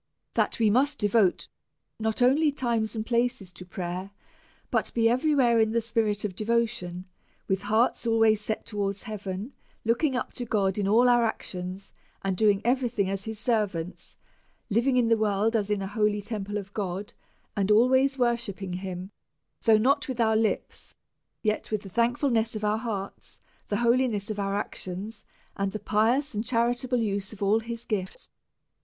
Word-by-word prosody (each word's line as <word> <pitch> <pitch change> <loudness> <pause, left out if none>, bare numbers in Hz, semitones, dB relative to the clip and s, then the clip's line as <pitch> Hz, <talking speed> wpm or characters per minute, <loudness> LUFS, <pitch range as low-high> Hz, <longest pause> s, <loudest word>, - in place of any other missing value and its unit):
That - - +1
we 220 -3 +3
must 275 +6 +2
devote 205 -3 +2 0.5
not 220 +2 0
only 290 +5 +4
time 235 -5 0
and 220 -1 -3
places 235 -5 0
to 180 - -10
prayer, 180 +1 -5 0.6
but 225 -3 0
be 230 -1 +4
every 260 +6 +2
where 240 -4 +4
in 220 0 +2
the 230 - +3
spirit 220 -2 0
of 190 -3 -4
devotion, 215 -5 -1 0.4
with 190 0 0
hearts 220 +3 +1
always 225 -2 +4
set 215 +1 -3
towards 200 -2 -3
heaven, 205 +1 -5 0.3
looking 255 +5 +2
up 250 - -3
to 245 - -5
God 200 -3 0
in 200 - 0
all 230 +5 +5
our 240 -1 +5
actions, 185 -3 -4 0.3
and 195 -1 0
doing 205 +1 +3
every 250 0 +2
thing* 200 -5 -1
as 195 0 -3
his 220 -1 -5
servants; 205 -6 -2 0.5
living 245 +5 +2
in 240 -2 +3
the 230 -1 +3
world 215 +1 +1
as 210 -2 0
in 205 -2 0
an 190 - -4
holy 210 0 +1
temple 205 -1 -4
of 200 -1 -7
God, 195 -1 -4 0.4
and 200 -1 0
always 260 +5 +4
worshipping 230 -6 -1
him, 185 +1 -5 0.5
though 220 -2 +6
not 280 +6 +2
with 255 -3 -4
our 220 -1 +3
lips, 220 0 -1 0.5
yet 215 -1 -1
with 215 -2 -2
the 195 - -9
thankfulness 235 +1 +1
of 215 - -4
our 210 +1 +1
hearts, 205 -4 -6 0.3
the 205 - -1
holiness 235 -3 +1
of 210 - -4
our 200 0 -1
actions, 200 +2 -5 0.3
and 195 -1 -2
the 215 - -3
pious 235 +8 +1
and 210 +1 -2
charitable 245 +1 0
use 200 -2 -2
of 205 -2 -6
all 205 +3 +3
his 230 +1 -7
gifts. 190 -4 -4
220 Hz, 175 wpm, -27 LUFS, 200-235 Hz, 0.6 s, though